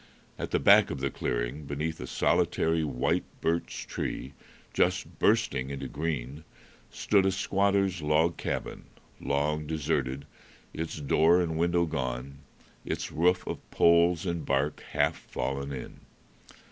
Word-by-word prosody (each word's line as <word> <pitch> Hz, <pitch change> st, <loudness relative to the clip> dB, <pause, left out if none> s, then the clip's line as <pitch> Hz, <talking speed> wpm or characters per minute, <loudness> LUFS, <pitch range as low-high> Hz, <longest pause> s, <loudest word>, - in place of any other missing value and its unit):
At -, -, -3 dB
the -, -, +2 dB
back -, -, +6 dB
of 70 Hz, -, -4 dB
the 70 Hz, -1 st, -1 dB
clearing, 60 Hz, +6 st, -3 dB
beneath 75 Hz, +3 st, -3 dB
a -, -, -6 dB
solitary 80 Hz, 0 st, +1 dB
white 65 Hz, -5 st, 0 dB, 0.2 s
birch 85 Hz, +1 st, -2 dB
tree 65 Hz, +2 st, -4 dB, 0.4 s
just -, -, 0 dB
bursting 65 Hz, +1 st, +2 dB
into 70 Hz, -1 st, -5 dB
green, 75 Hz, -2 st, -4 dB, 0.5 s
stood 100 Hz, -2 st, +2 dB
a 95 Hz, -, +2 dB
squatter's 100 Hz, -2 st, +1 dB
log 75 Hz, +3 st, +2 dB
cabin, -, -, -4 dB, 0.3 s
long 75 Hz, +2 st, -1 dB
deserted, 70 Hz, -3 st, -1 dB, 0.5 s
its 80 Hz, -1 st, -4 dB
door 80 Hz, +4 st, +4 dB
and 85 Hz, -3 st, -1 dB
window 85 Hz, +1 st, +2 dB
gone, 65 Hz, -3 st, -4 dB, 0.4 s
its -, -, -4 dB
roof 90 Hz, +3 st, +2 dB
of -, -, -4 dB
poles 85 Hz, +1 st, +4 dB
and 85 Hz, -3 st, -2 dB
bark 70 Hz, +2 st, 0 dB
half 75 Hz, +2 st, +2 dB
fallen 70 Hz, +1 st, -4 dB
in. 65 Hz, -3 st, -7 dB
75 Hz, 135 wpm, -28 LUFS, 70-85 Hz, 0.5 s, back